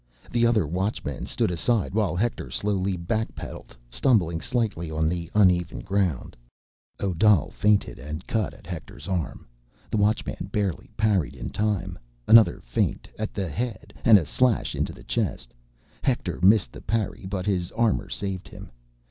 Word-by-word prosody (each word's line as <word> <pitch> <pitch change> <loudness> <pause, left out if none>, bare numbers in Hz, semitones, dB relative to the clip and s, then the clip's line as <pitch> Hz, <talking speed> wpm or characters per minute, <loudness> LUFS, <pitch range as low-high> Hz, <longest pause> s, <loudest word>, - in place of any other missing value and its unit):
The 120 0 +3
other 110 -7 +3
Watchmen 90 - -3
stood - - +1
aside 100 +4 0
while 100 -5 +1
Hector 110 +5 -1
slowly 100 -2 -1
backpedaled, 90 - -4
stumbling 85 - +2
slightly 105 -9 -1
on 80 0 0
the 85 0 -2
uneven 90 -5 +3
ground. 95 -8 -1 0.6
Odal 95 -2 +3
feinted 105 -9 +1
and 75 +7 -6
cut 110 -4 -1
at - - -17
Hector's 80 -3 -8
arm. 90 -5 -3 0.5
The - - +1
Watchman 105 +1 0
barely 100 -6 -1
parried 95 - +1
in - - -6
time. 105 - -1 0.3
Another 115 -1 +7
feint, - - -1
at 110 - -3
the 95 -3 -1
head, 115 - -4
and 115 -4 +8
a 85 - 0
slash 125 - +1
into - - -1
the - - -13
chest; - - -2 0.5
Hector 120 -9 -1
missed 95 - +5
the - - -10
parry 110 -4 -2
but 95 -2 -3
his 90 -4 0
armor 110 -4 +1
saved 95 -2 -4
him. - - -11
95 Hz, 150 wpm, -25 LUFS, 85-110 Hz, 0.6 s, and